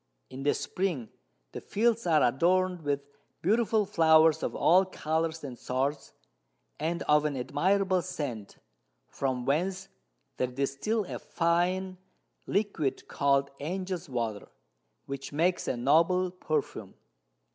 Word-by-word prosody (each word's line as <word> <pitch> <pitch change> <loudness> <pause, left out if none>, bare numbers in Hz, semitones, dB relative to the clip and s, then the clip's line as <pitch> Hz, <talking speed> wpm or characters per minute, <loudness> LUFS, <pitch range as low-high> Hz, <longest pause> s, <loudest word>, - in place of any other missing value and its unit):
In 130 +1 -7
the 145 +1 +2
Spring 170 - -2 0.4
the - - -7
Fields 230 -1 +1
are 155 -3 +4
adorn'd 180 +7 +2
with 145 -2 -1 0.4
beautiful 220 +2 +2
Flowers 160 -4 +5
of - - -3
all 185 +3 +5
Colours 160 -3 -2
and 130 -4 -7
sorts, 135 +3 -2 0.7
and 170 +2 -2
of 150 0 +4
an 150 -3 -1
admirable 185 +8 +1
Scent, 145 - -5 0.5
from 130 -2 -2
whence 185 +7 -1 0.5
they 130 - +1
distil 140 - -1
a - - -6
fine 180 +2 0 0.5
Liquid 200 -9 -1
called 140 0 +1
Angels 180 +2 -4
Water, 115 -5 -3 0.6
which 135 0 -6
makes 170 +5 +1
a 125 - -1
noble 165 +8 +3
Perfume. 155 -5 -3
160 Hz, 120 wpm, -29 LUFS, 140-185 Hz, 0.7 s, Flowers